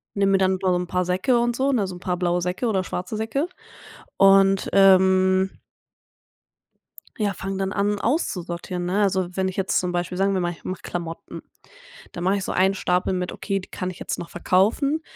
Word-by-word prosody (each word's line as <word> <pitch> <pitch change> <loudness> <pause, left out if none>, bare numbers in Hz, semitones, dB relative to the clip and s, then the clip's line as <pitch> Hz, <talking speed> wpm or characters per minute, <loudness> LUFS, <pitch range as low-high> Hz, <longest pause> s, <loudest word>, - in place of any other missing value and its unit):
nehme 195 -1 +2
mir - - +5
dann 190 0 +2
so' 185 -2 +2
n 180 0 -2
paar 180 +1 -1
Säcke 185 +8 +1
und 240 0 0
so, 270 +3 +1
ne, 220 -7 +1
so 185 - -7
'n - - -10
paar 180 0 -2
blaue 175 0 0
Säcke 180 +7 -2
oder 195 -4 +1
schwarze 185 +3 -5
Säcke. 225 +9 -1 0.7
Und, 195 0 +5
ähm 190 0 +5 1.7
ja, 205 -2 0
fange 195 +1 -5
dann 195 0 -2
an 205 +1 0
auszusortieren, 180 - -2
ne? 190 +4 0
Also, 190 -3 0
wenn 190 -1 0
ich 185 - -4
jetzt 195 -1 +1
zum 180 -1 -2
Beispiel, 175 0 -3
sagen 195 0 +2
wir - - +1
mal, 175 0 -1
ich 170 - -13
mache 185 -1 -5
Klamotten, 170 -1 -6 0.7
dann 175 - -6
mache 190 +2 +2
ich 195 - -4
so - - -3
einen 190 +1 +3
Stapel 180 -1 0
mit 180 -1 -2
„Okay, 195 -2 -3
die 185 - -11
kann 185 0 -4
ich 180 - -13
jetzt - - -4
noch 170 - -7
verkaufen,“ 220 - +1
190 Hz, 205 wpm, -23 LUFS, 180-200 Hz, 1.7 s, mir